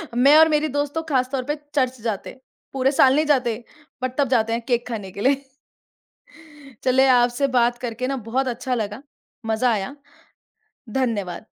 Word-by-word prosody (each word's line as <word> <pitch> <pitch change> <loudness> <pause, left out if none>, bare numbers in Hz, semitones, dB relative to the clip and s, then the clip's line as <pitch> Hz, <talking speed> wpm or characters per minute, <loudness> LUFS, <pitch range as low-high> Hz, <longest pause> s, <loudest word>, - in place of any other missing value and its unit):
मैं 275 +4 +6
और 320 0 +7
मेरी 305 0 +1
दोस्त 290 +1 -2
तो 325 - 0
खासतौर 255 -1 0
पे 295 +4 -2 0.2
चर्च 260 -2 0
जाते 220 -4 -3
हैं। 260 - -13 0.3
पूरे 270 0 +2
साल 270 -1 +5
नहीं 310 - +2
जाते। 250 -6 +1 0.4
बट 255 0 -3
तब 285 - +2
जाते 230 -3 +2
हैं, 235 - -1
केक 240 -2 0
खाने 205 -5 -5
के 200 - -8
लिए। 275 +4 +2 1.4
चलें, 265 +1 +4
आपसे 245 +2 +3
बात 240 0 +2
करके 245 0 -4
ना, 275 - -1
बहुत 255 +3 -2
अच्छा 250 +1 -3
लगा। 215 +3 -4 0.4
मज़ा 225 +2 +1
आया। 215 +6 -3 1.0
धन्यवाद। 205 -7 -2
255 Hz, 170 wpm, -22 LUFS, 230-270 Hz, 1.4 s, और